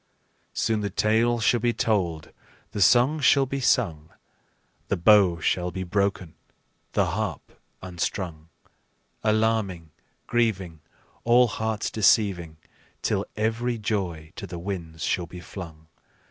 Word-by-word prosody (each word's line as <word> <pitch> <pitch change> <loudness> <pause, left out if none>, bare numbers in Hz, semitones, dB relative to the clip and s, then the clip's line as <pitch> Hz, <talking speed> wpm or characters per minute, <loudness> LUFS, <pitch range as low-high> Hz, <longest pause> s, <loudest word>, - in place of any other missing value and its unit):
Soon 110 -1 0
the 100 - -2
tale 115 +5 +2
shall 115 +2 +3
be 120 +1 +1
told, 90 -10 -1 0.4
the 105 - -4
song 125 +10 +5
shall 140 -1 +4
be 135 +1 -3
sung, 85 - +1 0.8
The - - 0
bow 90 -1 +5
shall 90 +2 0
be 95 +1 -5
broken, 95 -2 -1 0.6
the - - +3
harp - - -4 0.2
unstrung, 85 -2 -4 0.7
Alarming, 110 -7 0 0.3
grieving, 95 -9 -1 0.4
All 120 +1 +5
hearts 110 -1 -2
deceiving, 95 -6 +2 0.5
Till - - 0
every 115 +3 -1
joy 90 -8 -3
to - - -6
the 85 - -7
winds 85 -3 -6
shall 90 -2 -1
be 90 +2 -10
flung. 85 -4 -10
100 Hz, 120 wpm, -25 LUFS, 85-115 Hz, 0.8 s, song